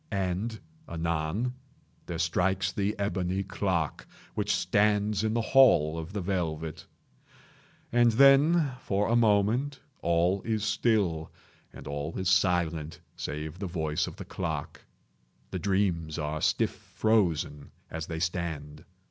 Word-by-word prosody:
And, 100 +3 -2 0.3
anon, 85 +8 -1 0.5
there 85 - -4
strikes 95 +3 +1
the 100 +2 -1
ebony 95 -1 -1
clock 95 -5 -2 0.3
which - - -1
stands 105 0 +2
in 110 +1 0
the 115 - +1
hall 80 - +6
of 80 +3 -7
the 100 -1 -3
velvet. 80 -4 -3 1.0
And 120 -1 +4
then, 140 +4 +5
for 100 +1 0
a 115 - +2
moment, 120 +5 +2 0.2
all 85 +3 +2
is 110 -1 -1
still, 100 -8 +1 0.4
and - - -11
all 75 +3 -4
is 95 -1 0
silent 85 -4 +1 0.2
save 75 +3 -5
the 100 - -3
voice 80 -3 -1
of - - -7
the - - -8
clock. 80 -5 -4 0.7
The 95 - -3
dreams 90 -5 0
are 75 -1 -3
stiff - - +2
frozen 85 -10 0 0.2
as 80 0 -4
they 80 - -4
stand. 80 -3 -3
95 Hz, 130 wpm, -28 LUFS, 80-105 Hz, 1.0 s, hall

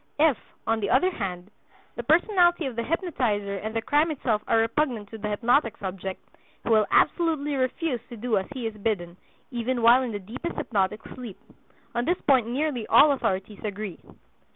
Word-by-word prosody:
If, 300 -2 +4 0.3
on 225 +1 +1
the 200 - -2
other 370 +1 +3
hand, 190 - -5 0.4
the - - -3
personality 345 - +3
of 260 -3 -4
the 235 - -1
hypnotizer 230 - -1
and 220 +3 -5
the 225 - -1
crime 295 +5 +2
itself 240 -8 -1
are - - +3
repugnant 225 -2 0
to 225 - -8
the 210 0 -3
hypnotic 230 +2 +2
subject, 190 0 -6 0.4
he - - -4
will 215 -2 +4
absolutely 315 -4 +2
refuse 260 +1 -1
to 240 - -8
do 230 +1 0
as 190 - -6
he 260 -4 -5
is 225 - -2
bidden, 185 -5 -2 0.3
even 240 0 -2
while 240 +3 +7
in 250 -3 -3
the 205 - -3
deepest 225 - -6
hypnotic 205 -1 -1
sleep. 240 -7 -8 0.6
On 240 0 -1
this 350 +4 +1
point 260 -5 +3
nearly 255 -2 -2
all 295 +1 +7
authorities 195 -6 -2
agree. 205 -3 -5
235 Hz, 180 wpm, -26 LUFS, 210-285 Hz, 0.6 s, while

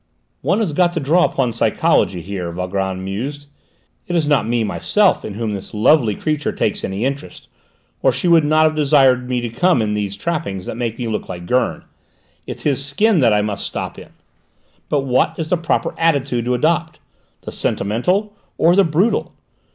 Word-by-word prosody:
"One 190 - +1
has 185 -9 -1
got 175 +2 +2
to 170 - -1
draw 160 +5 +3
upon 125 -4 -1
psychology 95 -5 +1
here," 90 -1 -5
Valgrand 95 +1 -3
mused. 135 +10 -5 0.6
"It 175 - -2
is 165 -3 +2
not 145 -6 +2
me, 120 -1 +1
myself, 200 - +1
in 100 - -6
whom 110 -1 -2
this 100 +1 -7
lovely 110 0 +3
creature 150 +2 -1
takes - - -2
any 100 +5 -2
interest, 140 +3 -5 0.5
or - - +4
she 180 - -2
would 165 -2 +5
not 155 +1 +3
have 155 0 +3
desired 135 -4 +3
me 125 -1 0
to 120 - -3
come 175 +6 +2
in 105 -2 0
these 100 -1 -2
trappings 100 - -3
that - - -5
make 115 -2 -3
me 120 - -3
look 110 - -4
like 90 -1 -7
Gurn; 125 +7 0 0.6
it's - - -7
his 140 -2 0
skin 185 +8 +2
that 120 -5 +4
I 105 0 +2
must 105 -1 -3
stop - - -5
in! - - -13 0.8
But 145 - +1
what 130 -2 +1
is 160 -1 -4
the 180 - +2
proper 165 0 -1
attitude 140 -7 +1
to 125 0 +1
adopt? 160 +4 0 0.4
The - - -7
sentimental? 180 - -1 0.2
Or 170 +2 +4
the 200 - +5
brutal? 185 +7 0
135 Hz, 190 wpm, -19 LUFS, 105-160 Hz, 0.8 s, would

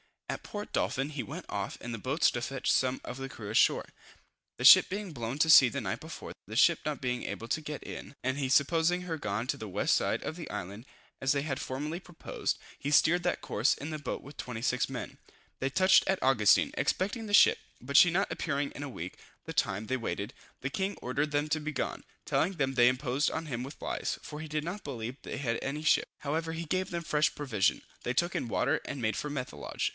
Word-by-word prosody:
At - - -4
Port 210 0 -6
Dolphin 135 +2 0
he 145 -3 -4
went 165 +6 -7
off 100 -1 -3
in 120 - -5
the 115 - -3
boats 135 +9 +2
to 120 - -3
fetch 135 +2 -1
some 130 0 +1
of 125 - -6
the 135 0 -5
crew 110 -5 -8
left 110 - 0
ashore, - - +3 0.7
the - - -5
ship - - +10
being 200 -1 -4
blown 120 -2 -4
to 160 - +4
sea 140 -4 +10
the 140 +3 -3
night 105 +1 -3
before. 160 +1 -8 0.2
The 110 - -7
ship 170 +7 +5
not 150 -2 -2
being 125 -2 -1
able 115 - -5
to 155 - 0
get 150 -1 -6
in, - - -8
and 130 +2 0
he 140 -2 0
supposing 165 +6 +3
her 170 -3 -4
gone 105 -4 -2
to - - -1
the 110 - -6
west 100 +1 +1
side - - +1
of 160 - -4
the 170 - -7
island, 100 +6 -6 0.3
as 135 +1 +2
they 140 - 0
had 135 -3 -2
formerly 150 +6 -4
proposed, 175 -3 -4 0.2
he 140 - -3
steered 170 +4 +4
that 175 - 0
course 110 +5 +1
in 145 +3 -6
his 155 -1 -5
boat 135 - -4
with 140 +2 -12
26 125 +1 -1
men. - - -6 0.4
They 135 - 0
touched 185 +7 +5
at 190 0 +1
Augustin, 120 -6 +5
expecting 205 +5 -1
the 205 - -5
ship, - - +7 0.2
but 140 +3 +1
she 175 - +9
not 190 +4 0
appearing 140 -3 -1
in 145 - -7
a 145 - -5
week, 90 -7 -7 0.3
the - - -6
time 95 +3 0
they 130 +3 -1
waited, 115 -1 -4 0.3
the 140 - -2
king 190 +5 -1
ordered 145 +4 -1
them 145 +1 0
to 155 +1 +1
be 155 0 -4
gone, - - -3 0.2
telling 185 +5 +1
them 135 -6 0
they 120 -2 +5
imposed 130 +2 +1
on 160 - -4
him 125 -4 -3
with 140 +4 -9
lies, - - -2
for 150 - -7
he 160 - -6
did 155 0 -2
not 180 +5 -5
believe 125 -2 -5
they - - -6
had 115 -4 -1
any 150 +3 -3
ship: 155 - +3
however 160 +3 -2
he 165 +1 -4
gave 185 +4 -1
them 170 -1 -3
fresh 150 -1 +1
provision: 120 -10 +1 0.2
they 120 - -1
took 175 +6 +1
in - - -2
water, - - +1
and 135 - -5
made 110 -2 0
for 150 - -3
Methelage. 130 - -3
140 Hz, 235 wpm, -30 LUFS, 125-160 Hz, 0.7 s, ship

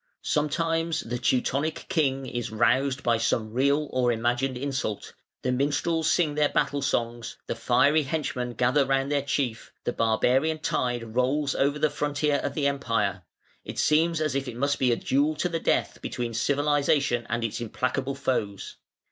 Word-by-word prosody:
Sometimes 165 +2 0
the 120 +1 -4
Teutonic 135 +5 0
king 135 -7 0
is 120 -2 -4
roused 130 +5 +1
by 115 -1 +2
some 110 -1 0
real 140 +4 +2
or 125 -1 +2
imagined 120 +3 0
insult; 130 -5 -3 0.3
the 125 - +1
minstrels 150 +5 +1
sing 155 -4 +2
their 150 0 +2
battle 145 -3 0
songs; 120 -4 -2
the - - -2
fiery 150 +2 +3
henchmen 135 -5 -3
gather 125 +5 +3
round 135 +1 0
their 145 -1 +2
chief; 135 -4 -2
the 120 - -1
barbarian 130 +7 +2
tide 120 -6 -2
rolls 135 +3 +1
over 140 +2 +1
the 150 -1 +1
frontier 145 0 0
of - - -3
the 145 - 0
Empire: 115 -9 0 0.4
it - - -8
seems 165 +2 +2
as 155 -3 0
if 135 0 -2
it 125 - -6
must 140 +2 0
be 130 -2 +3
a - - +3
duel 145 +6 +1
to 155 +4 0
the 165 -1 -2
death - - 0
between 120 -1 -4
civilisation 140 -1 +1
and 120 0 -1
its 115 +1 -3
implacable 130 +4 -2
foes. 110 -8 -3
135 Hz, 165 wpm, -26 LUFS, 120-150 Hz, 0.4 s, fiery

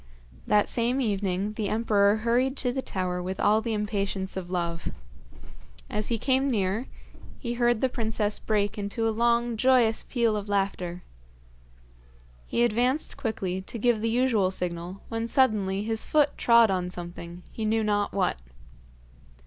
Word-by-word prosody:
That 210 -1 +3
same 240 +3 0
evening 200 -3 -1
the 210 -2 -2
emperor 210 -2 +3
hurried 245 +5 +1
to 250 - 0
the 265 +2 -2
tower 180 -5 -3
with 185 +1 -4
all 215 +1 +3
the 225 -1 -2
impatience 200 -2 -2
of 185 -2 -5
love. 170 -2 -2 1.0
As 210 0 -1
he 230 - 0
came 265 +3 +1
near 210 +1 0 0.5
he 240 -3 -4
heard 240 -1 +2
the 260 - +4
princess 220 -4 -1
break 205 -1 0
into 205 +3 -1
a - - +2
long, 235 +1 +1
joyous 245 -2 +3
peal 235 -4 +1
of 205 0 -4
laughter. 185 -3 -1 1.4
He 235 - +1
advanced 245 +6 +1
quickly 190 -6 -3
to 195 - -8
give 230 -1 +2
the 230 - +1
usual 230 -5 +2
signal, 180 0 -4
when 225 0 -2
suddenly 210 -6 +2
his 225 0 -2
foot 295 -2 +2
trod 235 -3 +5
on 180 -1 -1
something, 175 0 -8
he 220 - -5
knew 220 +1 +1
not 205 -1 +1
what. 190 - 0
215 Hz, 155 wpm, -27 LUFS, 195-235 Hz, 1.4 s, trod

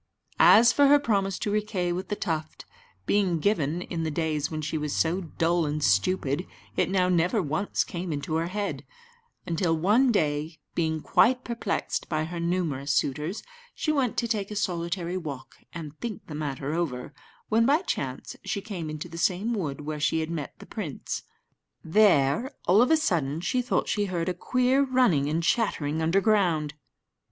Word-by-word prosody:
As 230 +1 +7
for 285 -1 +5
her 290 +1 +7
promise 200 -8 0
to 205 - -2
Riquet 205 -4 -1
with 185 +2 -4
the 205 - -2
Tuft, 160 -5 -4 0.4
being 195 -4 +2
given 165 -2 0
in 170 -2 -4
the 160 - -1
days 155 -1 -1
when 155 - -4
she 155 +1 -3
was 150 -1 -2
so 170 +4 +1
dull 165 -1 0
and 150 0 -2
stupid, 140 - +1 0.3
it - - +1
now 185 -1 +2
never 180 +5 +2
once 175 +4 0
came 175 -1 -5
into 145 +1 -3
her 165 +1 -1
head; 205 +2 -3 0.6
until 165 -1 0
one 215 +10 +4
day, 155 -4 0 0.2
being 160 -2 -1
quite 250 +2 +3
perplexed 230 -4 -3
by 155 -1 0
her 170 +2 -5
numerous 170 -5 -1
suitors, 150 +10 -1 0.3
she 310 - 0
went 270 -6 0
to 235 - +1
take 210 -4 -1
a 210 - -6
solitary 175 -1 -2
walk 140 -7 -7
and 155 -3 -7
think 235 -4 -5
the 155 - -9
matter 145 -1 -3
over, 145 -6 -3 0.4
when 230 +2 +3
by 300 +6 +3
chance - - -4
she 200 - -2
came 195 -6 -6
into 155 +2 -5
the 170 0 -8
same 190 +8 +1
wood 150 -9 -3
where 150 +1 -4
she 150 +2 +1
had 160 +1 -4
met 155 -4 -5
the - - -12
prince. - - -5 0.6
There, 165 - +3 0.2
all 190 +6 +5
of 250 - +4
a 320 - +5
sudden, 160 - 0
she 250 +7 0
thought 245 - 0
she 205 -1 0
heard 175 -3 -2
a - - 0
queer 255 +8 +2
running 250 - +3
about 150 - -1
and 165 - 0
chattering 160 -7 0
underground. 175 -4 +2
175 Hz, 180 wpm, -27 LUFS, 155-205 Hz, 0.6 s, As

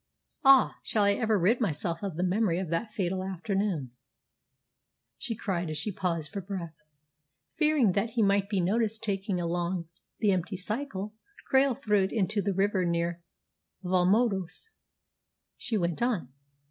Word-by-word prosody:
Ah, 270 -1 +6
shall 215 - +1
I 200 0 +4
ever 220 0 +1
rid 205 +8 +2
myself 165 -3 -1
of 195 -5 -4
the 175 - -1
memory 185 -1 +1
of 185 -3 -3
that 170 +7 -1
fatal 190 -3 -2
afternoon?" 190 - -2 1.3
she 230 - -2
cried 180 -6 -2
as 155 - -3
she 210 - -2
paused 170 -5 -2
for 200 -2 -4
breath. 180 -4 -5 0.8
"Fearing 300 - +3
that 200 +4 0
he 225 - +5
might 200 0 +2
be 200 -3 +1
noticed 220 +4 0
taking 195 -3 -1
along 170 0 -2 0.3
the 210 -3 +2
empty 185 +1 -1
cycle, 210 0 -3 0.4
Krail 265 -1 +4
threw 210 -6 +2
it 190 - -5
into 205 -1 0
the 200 - 0
river 195 -1 +2
near 170 0 -1 0.6
Valmondois," 190 - +1 0.8
she 225 - -2
went 170 -1 -1
on. 205 - -1
195 Hz, 150 wpm, -29 LUFS, 175-215 Hz, 1.3 s, Ah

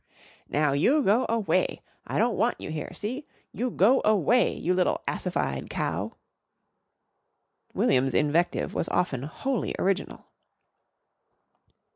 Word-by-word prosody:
"Now, 150 0 +2
you 270 - +3
go 220 +5 +3
away! 230 - 0 0.2
I - - -2
don't 235 0 +2
want 240 - +1
you - - -6
here. 155 -1 -5
See? 250 +8 -5 0.3
You 250 +2 -1
go 235 +5 +4
away 215 +4 +3
you 180 - 0
little 180 0 +1
assified - - -2
cow!" - - -3 1.6
William's 130 0 +2
invective 160 +4 +1
was - - -2
often 135 -8 0
wholly 230 - -3
original. 195 +1 -1
200 Hz, 115 wpm, -27 LUFS, 155-245 Hz, 1.6 s, go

